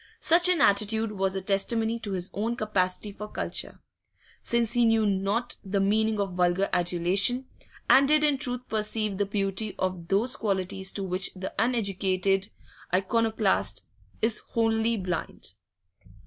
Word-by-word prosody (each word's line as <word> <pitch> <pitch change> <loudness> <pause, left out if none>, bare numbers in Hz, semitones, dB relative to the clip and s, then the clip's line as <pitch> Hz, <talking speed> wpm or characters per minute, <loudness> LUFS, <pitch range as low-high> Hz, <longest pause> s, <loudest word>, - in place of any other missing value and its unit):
Such 345 +2 +4
an 355 -5 +2
attitude 215 0 +2
was 195 -2 -1
a 190 - -2
testimony 225 +4 0
to 205 -3 -5
his 180 0 -3
own 225 +4 -2
capacity 205 -2 -1
for 210 +1 -8
culture, - - -4 0.6
since 235 -1 +1
he 240 -1 +3
knew 225 -1 +3
not 200 +4 -1
the 200 0 -1
meaning 215 +2 +1
of 195 -2 -2
vulgar 180 +2 +1
adulation, 180 +8 +3 0.4
and 275 +1 +6
did 305 +1 +3
in 290 -3 +2
truth 250 -1 0
perceive 215 -2 -1
the 205 - +1
beauty 200 +1 -2
of 185 -2 -3
those 225 +8 +1
qualities 190 -2 -2
to 200 - -3
which 185 0 -2
the 185 +1 -6
uneducated 195 -4 0 0.4
Iconoclast 200 - +1 0.4
is 225 -1 +2
wholly 225 0 0
blind. 180 - -4
205 Hz, 145 wpm, -27 LUFS, 190-225 Hz, 0.6 s, and